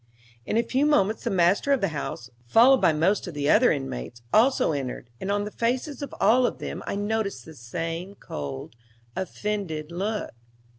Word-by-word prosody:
In 215 - 0
a 230 - +3
few 265 +5 +1
moments 220 -7 +2
the - - +1
master 190 +7 +3
of 275 - +4
the 195 - 0
house, 140 -5 -5 0.2
followed 250 - +6
by - - +5
most 175 +7 +1
of 170 - -7
the 145 -1 -1
other 245 +4 +5
inmates, 120 - -4
also 245 -4 +4
entered, 130 -4 -4
and 195 - -2
on 205 0 +1
the 210 - -5
faces 255 +7 -2
of 285 - -5
all 250 +2 +5
of - - -4
them - - -5
I - - -2
noticed 205 0 -2
the 160 - -11
same 165 +8 -5
cold, 70 - -7 0.4
offended 185 -5 -3
look. 205 +5 -2
195 Hz, 185 wpm, -26 LUFS, 155-225 Hz, 0.4 s, followed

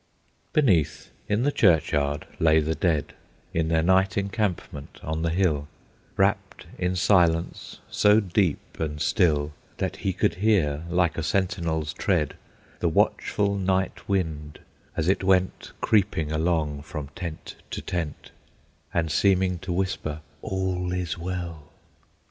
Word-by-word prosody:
Beneath, 100 - +2 0.2
in 105 +3 +2
the 145 - +2
churchyard, 75 - +2
lay 80 -1 +5
the 80 +1 0
dead, 80 -5 0 0.4
In 80 -1 +1
their 80 0 +2
night 95 +2 +3
encampment 100 -8 -3
on 80 +1 -2
the 85 - +1
hill, 80 -5 +1 0.5
Wrapped - - 0
in 90 +1 0
silence 85 -3 +2
so 105 +1 +4
deep 95 -5 -1
and 75 -2 -2
still 75 -5 +2 0.2
That - - -2
he 95 - -1
could 95 - +1
hear, 85 -8 +2
like 85 -1 +1
a - - 0
sentinel's 85 -4 -1
tread, 85 -7 0 0.5
The - - +1
watchful 100 -1 +1
night 95 0 -1
wind, 80 -6 -2 0.4
as 80 - 0
it 95 +1 +2
went 95 -1 +1
Creeping 95 -8 +2
along 80 -2 0
from 75 -2 -6
tent 85 0 -7
to - - -5
tent, 85 -5 -4 0.6
And 80 -2 0
seeming 95 +1 +2
to 90 - -5
whisper, 85 -4 -2 0.2
"All 95 -3 -2
is 90 -4 -2
well!" 85 -3 -5
85 Hz, 130 wpm, -26 LUFS, 80-95 Hz, 0.6 s, lay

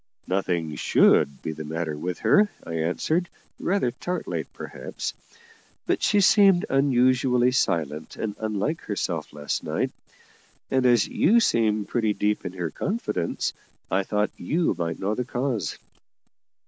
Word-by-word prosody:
"Nothing 85 -5 -1
should 70 -1 +3
be 80 - -2
the 80 0 -6
matter 80 0 -3
with 90 +4 -4
her," 210 0 +5
I 85 - -7
answered, 155 - 0 0.3
rather 180 -10 +1
tartly 180 +8 -3
perhaps; - - -6 0.7
"but - - 0
she 205 -1 +3
seemed 195 -2 +5
unusually 130 -2 +3
silent 80 - -1
and 105 -2 -4
unlike 110 +9 -2
herself 85 -6 -3
last 75 0 -3
night: - - -1 0.8
and, 130 -1 +3
as 120 -4 +4
you 225 +7 +4
seem 110 - +2
pretty 110 -3 0
deep 105 0 0
in 90 - -7
her 90 -4 -3
confidence, 190 - -2 0.4
I 95 - +3
thought 105 +2 0
you 165 +2 0
might 85 -1 -3
know 100 +2 -1
the 125 - -1
cause." 120 - -2
105 Hz, 135 wpm, -25 LUFS, 85-135 Hz, 0.8 s, her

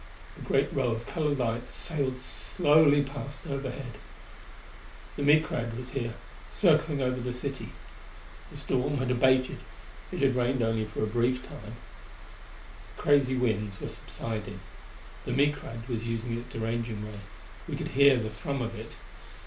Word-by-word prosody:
A - - -13
great 135 +1 +1
row 135 -2 +2
of 115 0 -2
colored 150 -2 0
lights 120 -1 -1
sailed 140 -6 -1
slowly 145 +1 +4
past 140 +2 -7
overhead. 135 -5 -4 1.2
The - - -4
Micrad 140 -6 +3
was 125 0 -6
here, 120 -4 -2 0.3
circling 155 -6 +3
over 125 0 0
the 125 +1 -2
city. 135 +2 -4 0.8
The - - -10
storm 135 +3 0
had 130 -1 0
abated; 130 +1 +3 0.5
it - - -2
had 135 -2 +4
rained 125 0 +2
only 115 -1 +1
for 105 0 -3
a - - +4
brief 120 +4 +1
time. 105 +2 -9 1.2
The - - -9
crazy 140 -3 +4
winds 105 -5 0
were - - -4
subsiding. 105 -3 -5 0.7
The - - -1
Micrad 135 -4 0
was 115 -3 -2
using 115 0 -2
its 120 +1 -6
deranging 115 -2 -3
ray: 105 -1 -8 0.5
we - - -1
could - - -4
hear 140 -1 +6
the 110 -2 -2
thrum 130 +4 -3
of 115 0 -3
it. 115 0 -8
125 Hz, 150 wpm, -29 LUFS, 115-140 Hz, 1.2 s, hear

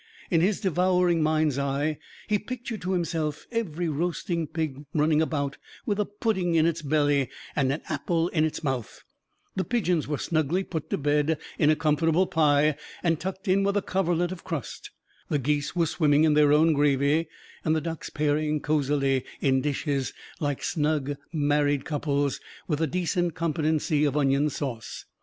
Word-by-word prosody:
In 165 -2 +4
his 190 +3 +2
devouring 180 -3 +2
mind's 155 -2 +2
eye, 140 +2 -1 0.3
he 210 -1 +2
pictured 235 -1 -6
to 185 +1 -1
himself 160 -4 -2
every 175 -8 -2
roasting 170 +1 -1
pig 155 -3 -3
running 155 0 +3
about, 145 -3 -2 0.3
with 210 -3 -1
a 210 - +2
pudding 205 -5 -1
in 160 -1 +4
its 165 -1 0
belly 145 -3 +2 0.3
and 135 -2 +2
an 145 - -3
apple 165 +2 0
in 155 -4 +1
its 160 +1 -2
mouth; 130 -6 -3 0.5
the 190 - 0
pigeons 180 -10 0
were 150 -1 -1
snugly 160 +5 0
put 160 -5 -5
to - - 0
bed 150 +2 +1 0.2
in 150 - +4
a 155 - +5
comfortable 160 +3 +2
pie 150 -2 +3 0.3
and 165 -3 +2
tucked 190 +2 -5
in 190 +1 +3
with 200 +1 +1
a 200 - 0
coverlet 175 -2 0
of 185 - -7
crust; 165 -8 -5 0.4
the 150 - +2
geese 145 +3 -1
were 170 -1 +3
swimming 150 -2 +3
in 155 -1 +4
their 150 -1 +5
own 155 +2 +5
gravy, 145 +2 +2 0.4
and 155 0 +2
the - - +2
ducks 165 0 -5
pairing 150 0 0
cosily 140 -3 +1 0.2
in 130 -1 +2
dishes, 140 -1 -1 0.3
like 145 -3 -2
snug 150 -2 0 0.2
married 145 -2 +1
couples, 145 -2 -1 0.3
with 150 -2 -1
a 160 - +2
decent 175 0 -1
competency 155 -2 0
of 145 -1 +1
onion 140 +1 +2
sauce. 125 -6 -5
155 Hz, 170 wpm, -26 LUFS, 145-170 Hz, 0.5 s, a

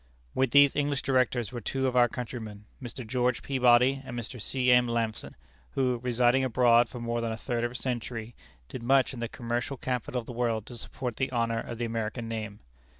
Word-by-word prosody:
With 130 -1 +2
these 140 +1 +6
English 145 -2 0
Directors 125 -4 +1
were 120 -2 -5
two 135 +5 -2
of 130 -1 0
our 120 -1 +5
countrymen, 110 -4 -7 0.2
Mr. 125 0 -7
George 125 +1 0
Peabody 130 0 +4
and 125 -2 -7
Mr. 120 0 -6
C. 125 +2 +1
M. 125 0 +5
Lampson, 115 -2 -2 0.4
who, 125 -2 +1
residing 125 +1 +2
abroad 120 -1 +4
for 125 - -8
more 115 0 -2
than 115 -1 -2
a 110 - -4
third 120 0 -2
of 120 - +1
a 125 - -12
century, 120 -2 -4 0.3
did 125 - -7
much 135 +2 +3
in 125 - -7
the 115 -1 -3
commercial 120 +2 -3
capital 125 0 -2
of 115 - -8
the 120 - -7
world 115 -3 -1
to 120 - -9
support 125 0 -5
the 130 - 0
honor 115 -2 0
of 115 0 -6
the 120 - -2
American 115 0 -3
name. 110 -2 -5
120 Hz, 210 wpm, -28 LUFS, 115-130 Hz, 0.4 s, these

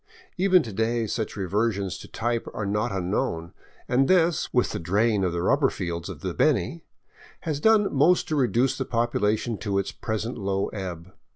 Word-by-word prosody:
Even 185 -2 +4
to 110 - -7
day 115 +2 0
such 110 +1 -3
reversions 100 0 -1
to - - -10
type 120 0 -2
are 105 - -2
not 105 +4 0
unknown; 90 -3 -2 0.3
and 135 +2 +3
this, 175 -3 +2
with 125 - +2
the - - -3
drain 100 +4 +1
of 90 - +1
the 85 0 -2
rubber 135 +6 +3
fields 85 -2 -4
of - - -8
the - - -3
Beni, - - +1 0.6
has 150 -3 -2
done 210 +3 +4
most 155 +6 +4
to 155 - 0
reduce 130 -1 +2
the 130 - -2
population 115 -2 0
to 100 -2 -1
its 100 - -1
present 110 +2 -4
low 95 0 -1
ebb. 90 -3 -7
110 Hz, 180 wpm, -25 LUFS, 95-130 Hz, 0.6 s, Even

